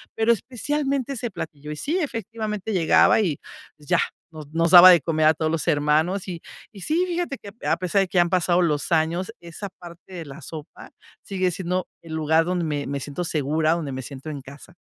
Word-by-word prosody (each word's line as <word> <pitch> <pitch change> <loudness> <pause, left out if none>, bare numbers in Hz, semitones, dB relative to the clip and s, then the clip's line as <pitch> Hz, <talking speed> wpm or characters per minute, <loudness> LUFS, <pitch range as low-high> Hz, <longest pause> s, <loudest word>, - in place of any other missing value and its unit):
pero 225 +1 +3
especialmente 275 +4 -1
ese 240 -3 -4
platillo. 150 -4 -7
Y - - -4
sí, 300 - -1
efectivamente 220 - -4
llegaba 180 +3 +4
y, 160 -8 -1 0.4
pues, 145 -1 -19
ya - - +4 0.4
nos 155 -2 -9
nos 165 +1 +2
daba 180 0 +11
de 170 -4 +5
comer 155 -2 0
a 160 - +6
todos 155 +1 -1
los 165 +1 -2
hermanos. 155 +6 +1
Y 170 -2 -6 0.3
y 200 -4 -12
sí, 325 - +1
fíjate 345 -6 -2
que 200 - -10 0.2
a - - +2
a - - 0
pesar 185 +2 +1
de 190 - 0
que 180 - -3
ya - - +7
han 175 - -3
pasado 180 0 +2
los 150 -1 0
años, 165 +3 0
esa 170 +4 -8
parte 175 +1 -13
de 170 -3 -6
la 140 +3 -10
sopa 155 +1 -10 0.3
sigue 185 -2 -1
siendo 180 +1 -2 0.2
el 160 -1 -8
lugar 160 +1 +2
donde 180 -1 -1
me 145 -2 -2
me 140 0 -3
siento 145 +6 -4
segura, 155 +1 0
donde 155 -5 -3
me 130 - -4
siento 140 +3 -8
en 145 -3 -6
casa. 140 +6 -13
170 Hz, 220 wpm, -23 LUFS, 155-195 Hz, 0.4 s, daba